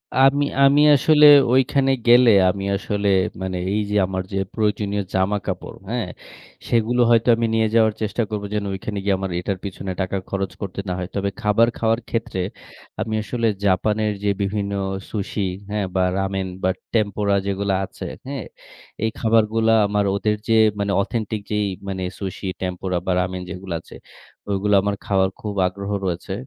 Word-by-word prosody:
আ - - -1
আমি 140 +1 +3 0.2
আমি 140 +2 +6
আসলে 150 +2 +5 0.3
ঐখানে 135 +1 +3 0.2
গেলে 120 +1 +7 0.2
আমি 95 +1 -3
আসলে 100 +1 -2 0.3
মানে 95 -1 -3 0.2
এই 105 - +1
যে - - 0
আমার 95 0 -3
যে - - -1 0.2
প্রয়োজনীয় 105 -2 0
জামাকাপড়, 95 +1 -2
হ্যাঁ? 120 -4 -2 0.6
সেগুলো 120 +1 +2
হয়তো 115 0 +4
আমি 115 0 0
নিয়ে 110 0 +2
যাওয়ার 110 -2 +4
চেষ্টা 110 +2 -1
করব, 105 -2 -3
যেন 105 -1 -1
ঐখানে 100 +2 -5
গিয়ে 100 -1 +2
আমার 95 -1 -3
এটার 95 +2 -3
পেছনে 95 -1 -5
টাকা 95 +1 -2
খরচ 95 -1 -2
করতে 100 -1 -5
না 90 - -1
হয়। 90 -1 -4
তবে 100 0 0
খাবার 105 +2 +4
খাওয়ার 115 0 +1
ক্ষেত্রে 115 -5 -2 0.6
আমি 110 - -3
আসলে 115 +1 -1 0.2
জাপানের 105 +3 +1
যে 105 - +2
বিভিন্ন 100 0 -2 0.4
Sushi, 105 -1 -3 0.3
হ্যাঁ? 105 -2 -1
বা 95 - +3
রামেন 95 -1 -1 0.2
বা 95 - +3 0.2
Tempura 100 -2 +1
যেগুলা 100 0 0
আছে, - - -9 0.2
হ্যাঁ? 140 -1 -5 0.6
এই 110 - +2
খাবারগুলা 115 0 +3
আমার 105 0 0
ওদের 105 +1 0
যে 115 - +3 0.2
মানে 100 0 0
অথেন্টিক 110 0 -3
যেই 105 -1 +1 0.2
মানে 95 -1 -3 0.2
Sushi, 95 0 -5
Tempura 90 0 -2
বা 95 - 0
Ramen 90 0 -2
যেগুলো 90 0 -6
আছে, - - -14 0.5
ওইগুলা 100 +1 +1
আমার 100 0 0
খাওয়ার 95 -1 +2
খুব 105 -1 -4
আগ্রহ 100 +2 -6
রয়েছে, 90 +1 -3
100 Hz, 165 wpm, -22 LUFS, 95-110 Hz, 0.6 s, গেলে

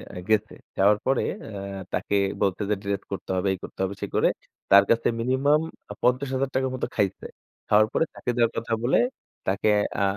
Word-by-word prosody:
আ - - -6
গেছে, 110 0 +2 0.2
যাওয়ার 105 +2 +4
পরে 135 0 +2 0.2
অ্যা 100 -2 -6
তাকে 100 - -1 0.3
বলছে 100 +1 +1
যে, 105 - +3
ডিরেক্ট 100 -1 -2
করতে 100 - -6
হবে, 95 +2 0
এই - - -5
করতে - - -10
হবে 95 +1 -1
সে - - -2
করে - - +4 0.4
তার 100 0 +9
কাছে 115 0 +3
মিনিমাম 135 +5 +2 0.3
আ - - -3
৳৫০,০০০ 130 +1 +1
মত 130 - -7
খাইছে। 100 -2 0 0.4
খাওয়ার 110 +1 +5
পরে 160 - +2
চাকরি 125 - -3
দেয়ার 115 -1 +3
কথা 115 - -2
বলে 125 - +3 0.5
তাকে 100 +3 +1 0.3
আ - - +3
110 Hz, 185 wpm, -25 LUFS, 100-130 Hz, 0.5 s, তার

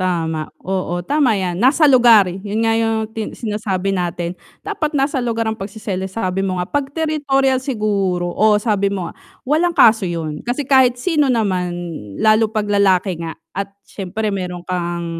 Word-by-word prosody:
Tama 165 -4 -1 0.2
oo 185 -2 -2
tama 275 -3 +2
yan 180 -2 -2
nasa 275 +6 +4
lugar 240 -7 +6
yun 200 +5 -3
nga 225 - +3
yung 225 -1 0
tin 220 -1 -5
sinasabi 205 -4 -2
natin, 175 -1 -2 0.3
dapat 305 -1 -2
nasa 275 0 0
lugar 230 -1 -1
ang 220 - 0
pag-seselos 195 -2 -5
sabi 190 -4 -1
mo 185 -2 -1
nga 180 - -2
pag 285 +3 -1
territorial 280 -4 +1
siguro, 200 -8 -1
oo 215 0 +4
sabi 205 -2 +1
mo 190 -3 -3
nga, - - -8 0.3
walang 335 +5 +1
kaso 225 -6 +6
yun, 160 -3 -4
kasi 250 +4 -2
kahit 260 -3 +4
sino 295 +1 +1
naman 185 -7 0 0.4
lalo 220 0 +4
pag 215 -2 -1
lalaki 190 -3 +2
nga, 165 -1 -5 0.2
at 195 +1 -3 0.2
siyempre 205 +2 -4
meron 180 -2 -4
kang 175 -1 -3
210 Hz, 165 wpm, -19 LUFS, 185-245 Hz, 0.4 s, lugar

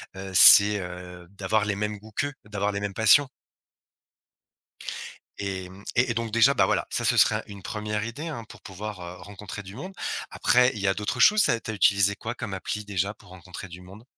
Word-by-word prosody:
heu, 95 0 -8
c'est, 100 +2 +9
heu, 90 -1 -9
d'avoir 100 +2 -1
les 100 -1 -2
mêmes 105 +1 -4
goûts 110 +2 -16
qu'eux, 145 +2 -2
d'avoir 105 -1 -3
les 100 - -4
mêmes 100 -1 -5
passions. 110 +7 +4 2.1
Et 95 -2 -5
mmh, 95 +2 -15
et 125 0 +2
et - - -1
donc 115 -1 -3
déjà, 115 +5 +3
bah, - - +3
voilà, - - -1
ça, - - -2
ce - - +2
serait - - +4
un - - -5
une 100 -2 -11
première 105 0 -4
idée, 145 +8 -7
hein, 115 -8 -7
pour - - -14
pouvoir, 100 0 -8
heu, 90 +1 -9
rencontrer 100 +1 -9
du 95 +2 -11
monde. 185 +10 -9 0.4
Après, 125 +1 +3
il 105 - -7
y 100 - -1
a 95 - +1
d'autres 105 +4 -4
choses, 210 +8 +5
ça 115 - +2
tu - - -7
as - - -6
utilisé 100 0 +3
quoi 110 +3 -7
comme 105 -4 -6
appli 105 +3 -5
déjà, 100 +1 -3
pour - - -20
rencontrer 90 +1 -10
du 90 +1 -12
monde? 95 +5 -15
100 Hz, 220 wpm, -25 LUFS, 95-110 Hz, 2.1 s, c'est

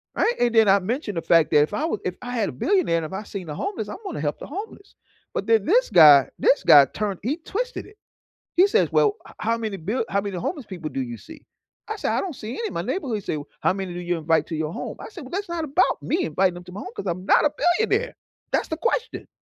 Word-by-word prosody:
Right? 475 - +2
And 240 -1 +2
then 225 -2 +5
I 195 +1 +6
mentioned 210 - -3
the - - 0
fact 165 -2 +3
that 150 - +6
if 150 - 0
I 295 - -1
would 320 - -2
if 180 - -3
I 245 - -6
had 230 -4 0
a - - -7
billionaire 345 - +1
and 165 - -2
if 155 - -8
I 195 - -4
seen 195 -4 -7
the 150 - -5
homeless, 285 - -4
I'm - - -6
gonna 390 - -4
help 145 0 -2
the - - -7
homeless. 400 +4 -8 0.4
But - - -3
then 225 -3 +3
this - - +3
guy 145 -5 +8
this 280 - +3
guy 140 -1 +8
turned 200 +6 -4
he 270 +8 -1
twisted 485 +9 -4
it. 420 - -17 0.6
He 365 +3 +6
says, 450 +3 +2
"Well, 415 -1 +3
h - - -14
how 230 +1 0
many 220 -3 -4
bill 210 +8 -2
how 200 -3 0
many 200 -2 -4
homeless 275 - -4
people 170 -5 -6
do 135 - -3
you 120 -2 -5
see?" 320 - -13 0.5
I 435 - -3
said, 420 - -2
"I - - +1
don't 355 -7 -5
see 220 -1 -7
any 460 - -3
in - - -8
my - - -2
neighborhood." 275 - -2
He - - -6
said, 155 - -3 0.2
"How - - +2
many 190 -2 -5
do 175 - -5
you 175 0 -2
invite 160 -1 +1
to 165 - -4
your 155 0 -2
home?" - - -6
I - - -8
said, 390 -5 -10
"Well, 260 - -11
that's 395 +1 -3
not 340 -1 -2
about 310 +4 +1
me 345 +1 0
inviting 190 -1 +1
them 175 0 -10
to 180 - -11
my 205 - -6
home - - -7
'cause 195 - -5
I'm 185 +1 -3
not - - +4
a 295 - +3 0.3
billionaire." 445 +2 0 0.4
That's - - +1
the 320 - -4
question. 470 +4 -2
215 Hz, 280 wpm, -23 LUFS, -, 0.6 s, guy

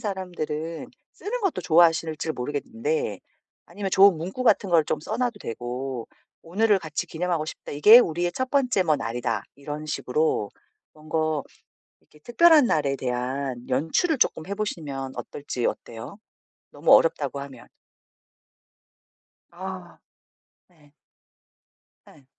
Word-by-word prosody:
사람들은 170 -6 -4 0.3
쓰는 - - -5
것도 390 - -1
좋아하실지 165 -2 +3
모르겠는데 230 - -3 0.5
아니면 200 -2 -5
좋은 195 -2 +7
문구 185 +10 -5
같은 200 -5 +3
걸 165 -3 +4
좀 150 - -2
써 215 +8 -4
놔도 245 -3 -1
되고 120 +2 -5 0.3
"오늘을 205 +5 +2
같이 160 -3 -4
기념하고 170 -1 -2
싶다. - - -8
이게 210 +11 +8
우리의 175 -5 0
첫 260 +6 -3
번째 255 -8 +2
뭐 155 -3 +3
날이다." 115 -3 -2
이런 150 +2 -7
식으로 150 -7 -1 0.4
뭔가 155 -1 -2 0.6
이렇게 150 - -23
특별한 305 - +5
날에 145 -8 +1
대한 125 0 -3
연출을 160 - +1
쪼끔 160 - +1
해 200 - -3
보시면 145 -10 -4
어떨지. 130 -4 -4
어때요? 115 - -6 0.5
너무 - - +2
어렵다고 140 -4 +2
하면. 135 -4 -10 1.8
아. 185 0 -8 0.7
네. 150 -5 -25 1.2
예. 140 - -19
160 Hz, 270 characters per minute, -25 LUFS, 140-195 Hz, 1.8 s, 이게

